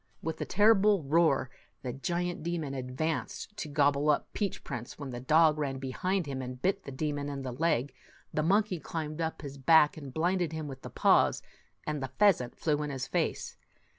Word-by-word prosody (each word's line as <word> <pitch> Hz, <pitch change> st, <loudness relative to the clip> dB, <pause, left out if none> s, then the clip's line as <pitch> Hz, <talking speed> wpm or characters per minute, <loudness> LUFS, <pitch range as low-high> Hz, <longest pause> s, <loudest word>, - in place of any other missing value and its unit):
With 160 Hz, 0 st, -3 dB
a -, -, -1 dB
terrible 205 Hz, -2 st, +4 dB
roar, 140 Hz, -3 st, +2 dB, 0.3 s
the 125 Hz, -2 st, -3 dB
giant 175 Hz, +5 st, -2 dB
demon 160 Hz, -4 st, -3 dB
ad 130 Hz, -1 st, -6 dB
vanced 155 Hz, -, -2 dB
to 155 Hz, -, -4 dB
gobble 145 Hz, 0 st, +2 dB
up 150 Hz, -, +1 dB
Peach 200 Hz, -3 st, -2 dB
Prince, 120 Hz, 0 st, -6 dB
when 140 Hz, -3 st, -6 dB
the 120 Hz, -, -5 dB
dog 155 Hz, +3 st, +4 dB
ran 135 Hz, -3 st, -2 dB
behind 175 Hz, +7 st, -2 dB
and 130 Hz, -2 st, -5 dB
bit 195 Hz, +6 st, 0 dB
the -, -, -6 dB
demon 145 Hz, +1 st, -2 dB
in 140 Hz, -1 st, -5 dB
the 130 Hz, -, -4 dB
leg, 140 Hz, -1 st, 0 dB, 0.4 s
the 155 Hz, -, +1 dB
monkey 195 Hz, +2 st, +2 dB
climbed 155 Hz, 0 st, -4 dB
up 160 Hz, -1 st, -3 dB
his 140 Hz, -1 st, -7 dB
back 155 Hz, +2 st, +5 dB
and 140 Hz, -4 st, -8 dB
blinded 175 Hz, +2 st, 0 dB
him 155 Hz, -1 st, -4 dB
with 135 Hz, -2 st, -9 dB
his -, -, -9 dB
paws, -, -, +3 dB, 0.4 s
and 150 Hz, -2 st, -2 dB
the 135 Hz, -, -3 dB
pheasant 190 Hz, -13 st, +3 dB
flew 150 Hz, -2 st, 0 dB
in 150 Hz, -, -3 dB
his 135 Hz, -2 st, -3 dB
face. -, -, -2 dB
150 Hz, 195 wpm, -30 LUFS, 135-170 Hz, 0.4 s, back